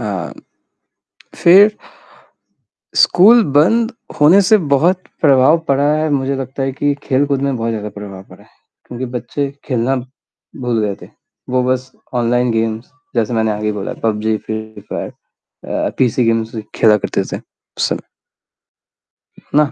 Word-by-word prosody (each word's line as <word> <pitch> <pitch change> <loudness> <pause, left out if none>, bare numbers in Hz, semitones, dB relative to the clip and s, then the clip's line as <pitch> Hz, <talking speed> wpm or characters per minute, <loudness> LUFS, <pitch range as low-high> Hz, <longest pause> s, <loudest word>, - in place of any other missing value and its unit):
अ, 100 -6 -4 1.0
फिर 200 +5 +6 1.2
स्कूल 220 +6 +6
बंद 225 - +3 0.3
होने 165 +7 +7
से 215 +3 +4 0.2
बहुत 175 +6 +2 0.2
प्रभाव 140 +1 +5
पड़ा 140 +1 +2
है, 155 0 0
मुझे 135 -1 0
लगता 135 +1 -5
है 135 0 -1
कि 145 +2 0
खेल-कूद 140 0 +1
में 140 -2 0
बहुत 115 0 -2
ज़्यादा 105 -2 -4
प्रभाव 100 -2 -9
पड़ा - - -15
है, - - -23 0.4
क्योंकि 125 +1 -5
बच्चे 140 +3 -3
खेलना 130 0 0 0.7
भूल 120 -2 0
गए 100 - -2
थे। - - -11 0.4
वो 130 0 +2
बस 130 0 -1 0.2
ऑनलाइन 120 0 +1
गेम्स, 115 +1 -2 0.3
जैसे 115 +1 0
मैंने 110 -1 +1
आगे 105 +1 -2
बोला 105 -2 -4
पबजी, 110 0 0
फ्री 110 0 -7
फायर - - -4 0.6
अ, - - -1
पीसी 125 -1 +2
गेम्स 115 0 0 0.2
खेला 110 -2 +5
करते - - -2
थे, - - -1 0.4
उस - - +1
समय। - - -4 1.5
ना? 150 -1 +3
130 Hz, 145 wpm, -17 LUFS, 110-145 Hz, 1.5 s, होने